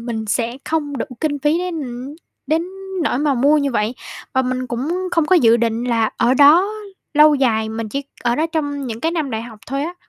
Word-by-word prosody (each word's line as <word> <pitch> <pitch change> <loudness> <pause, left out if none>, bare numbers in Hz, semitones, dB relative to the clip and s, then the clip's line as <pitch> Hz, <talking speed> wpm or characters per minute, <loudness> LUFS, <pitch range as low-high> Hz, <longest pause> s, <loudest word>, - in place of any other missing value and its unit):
mình 230 -2 -4
sẽ 230 +3 -1
không 295 -3 -2
đủ 250 - -3
kinh 295 -2 -1
phí 295 +4 +1
đến, 355 -2 -3
ừm, 250 +2 -7 0.3
đến 320 +2 +1 0.4
nỗi 260 - 0
mà 290 -2 +1
mua 280 +5 +4
như 280 -1 0
vậy, 220 +2 0 0.4
và 260 - +2
mình 255 0 -2
cũng 320 +11 -2
không 330 -3 +1
có 370 - +5
dự 235 -8 +5
định 235 0 -1
là 230 -3 +1
ở 250 +2 +3
đó 310 +8 +6 0.5
lâu 300 0 +7
dài, 220 -5 +1
mình 220 0 -4
chỉ 275 +6 -3 0.2
ở 240 0 +1
đó 315 - +1
trong 285 -3 -2
những 225 -2 -5
cái 325 +5 0
năm 315 -5 -2
đại 220 -1 -3
học 230 -3 -11
thôi 275 +2 -2
á. 340 +4 -4
270 Hz, 225 wpm, -19 LUFS, 235-305 Hz, 0.5 s, lâu